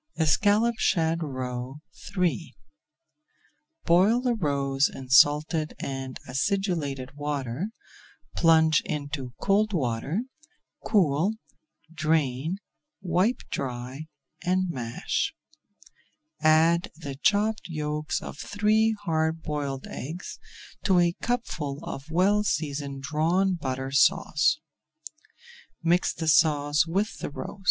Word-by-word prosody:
ESCALLOPED 205 +8 +3
SHAD 165 0 +1
ROE 130 -2 -4 0.4
III 175 -2 0 1.3
Boil 190 +8 +4
the 250 -1 +1
roes 140 -7 +1
in 130 -1 -9
salted 150 +3 +4
and 135 -1 -5
acidulated 145 -3 -1
water, 145 - -3 0.7
plunge 160 -2 +5
into 145 -4 -4
cold 210 +2 +2
water, 140 - -1 0.6
cool, 180 0 +2 0.6
drain, 155 0 0 0.4
wipe 190 +6 +1
dry, 130 +3 -4 0.4
and 185 0 +1
mash. 120 -5 -2 1.1
Add 160 +2 +4
the 145 -4 -7
chopped 210 +9 +1
yolks 150 -2 -3
of - - -8
three 215 +2 +2
hard 160 -2 0
boiled 140 -3 -3
eggs 160 +8 -7 0.4
to 190 -2 +3
a 175 -1 +4
cupful 165 - -2
of 135 +3 -7
well 195 +5 +3
seasoned 140 -6 -2
Drawn 165 +6 +1
Butter 135 -5 -3
Sauce. 140 - +3 1.3
Mix 175 +2 +3
the 165 -1 -5
sauce 150 +1 +4
with 195 +6 -1
the - - -4
roes. 165 +7 -7
155 Hz, 100 wpm, -26 LUFS, 140-185 Hz, 1.3 s, plunge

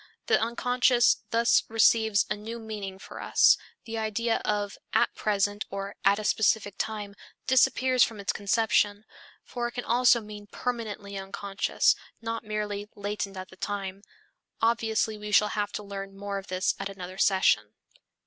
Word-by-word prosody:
The - - +3
unconscious 245 +2 +3
thus 230 +1 +4
receives 220 -1 +4
a 210 - -1
new 220 +3 -7
meaning 210 -4 -6
for - - -10
us; - - +5 0.3
the 225 -1 -4
idea 225 +1 0
of 205 -1 -1 0.2
"at - - +3
present" 205 0 0
or 195 0 -5
"at 200 +1 +4
a 215 - -4
specific 210 0 +2
time" 210 -2 -3 0.3
disappears 255 0 +4
from 220 -2 -2
its 200 - -1
conception, 205 0 +1 0.4
for 240 -1 -3
it 240 - -8
can 245 - -5
also 240 +1 +4
mean 210 -1 -10
permanently 210 -5 -4
unconscious, 195 +1 0 0.2
not 230 0 -4
merely 210 -1 -4
latent 205 -1 -4
at 185 0 -7
the 185 - -16
time. 195 -1 -4 0.6
Obviously 225 -1 +1
we 210 0 -6
shall 210 +1 +5
have 205 -1 -2
to 210 - -4
learn 195 -1 -7
more 200 0 -4
of 195 - -12
this 185 +1 0
at 195 0 -3
another 185 -1 -8
session. 110 - +3
210 Hz, 160 wpm, -27 LUFS, 200-225 Hz, 0.6 s, us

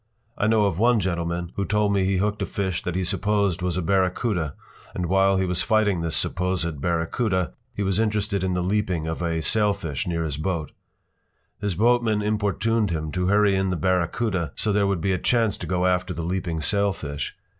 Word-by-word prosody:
I 105 - 0
know 110 -1 +4
of 95 -3 -1
one 120 +1 +4
gentleman 85 -2 -2
who 100 - +1
told 105 0 +1
me 100 -1 +2
he 95 0 +1
hooked 105 +2 0
a - - -1
fish 95 -3 -2
that 90 - -3
he 95 - 0
supposed 100 -1 0
was 90 -1 -1
a 90 - -1
barracuda, 90 - 0 0.4
and 90 - -1
while 95 +2 +3
he 95 - +1
was 90 0 -1
fighting 105 -3 +2
this 85 -2 -2
supposed 85 -5 -1
barracuda 85 - 0 0.2
he 100 - -1
was 95 +1 0
interested 105 -3 0
in 90 -1 0
the 90 - 0
leaping 95 -4 0
of 80 +1 -3
a 85 -2 -1
sailfish 100 - 0
near 85 -1 -1
his 75 -3 -3
boat. 80 -1 -2 0.9
His 100 -4 -2
boatman 115 0 +2
importuned 105 +1 +1
him 80 -2 -3
to 90 +1 -1
hurry 100 0 +4
in 95 0 +1
the 90 - 0
barracuda 90 - 0
so 105 - 0
there 100 -1 +2
would 100 -4 0
be 95 +2 +1
a 90 - -1
chance 115 -2 +2
to - - -6
go 90 0 0
after 90 -1 +1
the 85 - -4
leaping 85 -2 -2
sailfish. 95 -7 -1
95 Hz, 200 wpm, -24 LUFS, 85-105 Hz, 0.9 s, know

